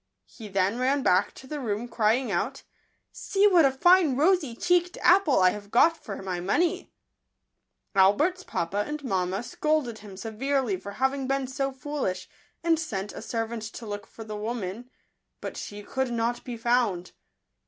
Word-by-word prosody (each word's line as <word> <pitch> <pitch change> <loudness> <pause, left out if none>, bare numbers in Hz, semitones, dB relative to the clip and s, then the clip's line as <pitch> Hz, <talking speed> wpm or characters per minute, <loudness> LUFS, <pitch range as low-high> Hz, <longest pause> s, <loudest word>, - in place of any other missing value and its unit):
He 220 - -11
then 195 +3 0
ran 265 +2 +1
back 180 +2 +3
to - - -12
the 295 +3 -5
room, 225 -2 -2
crying 230 +1 +1
out, 210 +10 -2 0.2
" - - -46
See 400 +1 +1
what 360 -7 +6
a 270 - +4
fine 345 0 +4
rosy 305 -4 +2
cheeked 355 +3 +1
apple 355 -5 +5
I 185 -1 +5
have 205 0 -8
got 325 +9 +5
for 200 -10 -8
my 185 -2 -3
money 290 - 0 0.5
!" - - -53
Albert's 290 - +3
papa 195 - -2
and 300 0 -5
mamma 190 -3 -1
scolded 290 -5 -1
him 205 -2 -11
se 220 +3 -6
verely 250 -4 -1
for 200 +1 -7
having 265 +3 0
been 270 0 0
so 270 +1 -2
foolish, 265 -7 -3 0.4
and 330 -2 +3
sent 205 - -4
a - - -7
servant 230 0 -3
to 220 +2 -8
look 205 -1 -6
for 225 - -10
the 215 -1 -7
woman; 220 +1 -4 0.5
but - - -6
she 205 0 -7
could 265 +3 -2
not 235 +1 -1
be 245 -2 -6
found. 225 -6 +1
240 Hz, 175 wpm, -27 LUFS, 205-285 Hz, 0.5 s, what